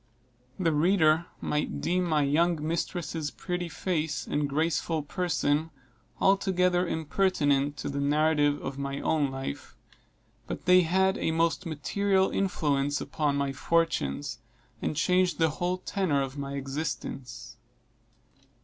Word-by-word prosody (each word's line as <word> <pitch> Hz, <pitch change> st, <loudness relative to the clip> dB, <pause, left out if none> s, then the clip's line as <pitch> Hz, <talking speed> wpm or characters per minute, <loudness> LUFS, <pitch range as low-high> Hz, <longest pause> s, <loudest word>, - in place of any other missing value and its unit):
The 170 Hz, -3 st, +2 dB
reader 160 Hz, 0 st, +3 dB
might 150 Hz, 0 st, -1 dB
deem 180 Hz, +1 st, 0 dB
my 155 Hz, -3 st, +2 dB
young 155 Hz, +2 st, +1 dB
mistress' 165 Hz, -2 st, -2 dB
pretty 180 Hz, +1 st, -4 dB
face 160 Hz, -4 st, -2 dB
and 145 Hz, -1 st, -1 dB
graceful 160 Hz, +1 st, 0 dB
person 160 Hz, -2 st, 0 dB, 0.5 s
altogether 180 Hz, -2 st, +2 dB
impertinent 145 Hz, -4 st, +1 dB
to 125 Hz, -, -4 dB
the 140 Hz, 0 st, -3 dB
narrative 145 Hz, 0 st, +2 dB
of 135 Hz, +1 st, -5 dB
my 140 Hz, 0 st, -3 dB
own 150 Hz, -3 st, +1 dB
life; 135 Hz, -, -6 dB, 0.7 s
but -, -, -6 dB
they 180 Hz, 0 st, +7 dB
had 190 Hz, +3 st, +2 dB
a -, -, 0 dB
most 165 Hz, +2 st, +1 dB
material 190 Hz, +5 st, +1 dB
influence 145 Hz, -7 st, 0 dB
upon 150 Hz, -2 st, -1 dB
my 140 Hz, -1 st, -1 dB
fortunes, 135 Hz, -, 0 dB, 0.4 s
and -, -, -2 dB
changed 180 Hz, +1 st, +2 dB
the 160 Hz, -1 st, +3 dB
whole 180 Hz, +3 st, -1 dB
tenor 180 Hz, -7 st, 0 dB
of 135 Hz, 0 st, -6 dB
my 140 Hz, -1 st, -5 dB
existence. 135 Hz, -2 st, -5 dB
155 Hz, 125 wpm, -28 LUFS, 145-180 Hz, 0.7 s, they